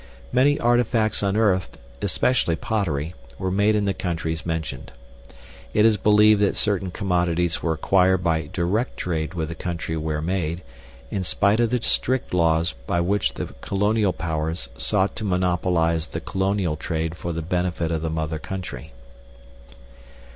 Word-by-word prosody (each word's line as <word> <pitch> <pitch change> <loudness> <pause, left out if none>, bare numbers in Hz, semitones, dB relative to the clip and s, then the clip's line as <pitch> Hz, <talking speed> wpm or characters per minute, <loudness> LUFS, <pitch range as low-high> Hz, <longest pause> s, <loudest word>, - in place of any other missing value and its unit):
Many 140 +3 +3
artifacts 120 -2 +2
unearthed 100 -2 +1 0.2
(especially 115 -10 +1
pottery) 85 -7 -2 0.2
were 95 0 -2
made 105 +3 +3
in 105 -1 +1
the 100 - +1
countries 80 -3 -3
mentioned. 80 -7 -4 0.8
It 105 - +5
is 110 -1 +5
believed 105 +1 +5
that 100 - +2
certain 100 -3 0
commodities 90 -3 0
were 80 - +1
acquired 95 +2 +3
by 80 -3 0
direct 100 +7 -1
trade 80 0 -2
with 80 -2 -2
the - - -4
country 85 -1 -4
where 75 -1 -2
made, 85 0 -2 0.5
in 95 - -1
spite 100 +4 +2
of 120 -1 +3
the 125 -1 -1
strict 130 -5 0
laws 85 -2 +2
by 85 - +1
which 85 -8 0
the - - -5
Colonial 105 0 +1
Powers 80 0 -3
sought 95 +1 +1
to - - -4
monopolize 90 -4 +1
the - - -5
colonial 95 -4 -1
trade 80 0 -2
for 85 0 -5
the 80 -1 -3
benefit 90 -1 -1
of 80 -2 -1
the 80 - -2
mother 80 0 -2
country. 90 -10 -7
90 Hz, 150 wpm, -23 LUFS, 80-100 Hz, 0.8 s, It